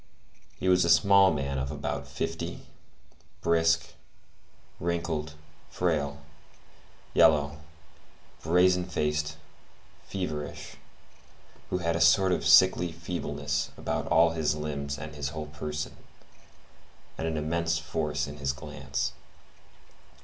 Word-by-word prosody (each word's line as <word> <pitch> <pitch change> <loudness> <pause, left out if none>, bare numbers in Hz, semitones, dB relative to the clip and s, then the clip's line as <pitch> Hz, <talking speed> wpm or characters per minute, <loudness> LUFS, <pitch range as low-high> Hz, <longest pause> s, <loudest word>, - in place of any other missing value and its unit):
He - - -2
was 90 0 +5
a 85 - +1
small 100 +2 +6
man 70 -3 -2
of 65 +1 -3
about 70 0 -4
fifty, - - -4 0.8
brisk, 85 -1 +2 0.9
wrinkled, 85 -2 -2 0.4
frail, 75 -5 -1 1.0
yellow, 75 -1 +4 0.8
brazen 90 +2 +3
faced, 75 -2 -1 0.7
feverish, 80 -6 -5 0.9
who - - 0
had 85 -2 0
a 85 - -1
sort 95 +3 +5
of 90 - 0
sickly 90 +2 +6
feebleness 75 -4 -3
about - - -2
all 80 +1 +5
his 80 -2 0
limbs 70 -2 -4
and 75 +2 -7
his 70 -2 -3
whole 75 +1 -5
person, 75 0 -5 1.2
and 80 - -3
an 80 -1 -2
immense 85 +2 0
force 75 -2 -2
in 70 +1 -8
his 70 -2 -1
glance. 70 0 -4
80 Hz, 110 wpm, -28 LUFS, 75-85 Hz, 1.2 s, small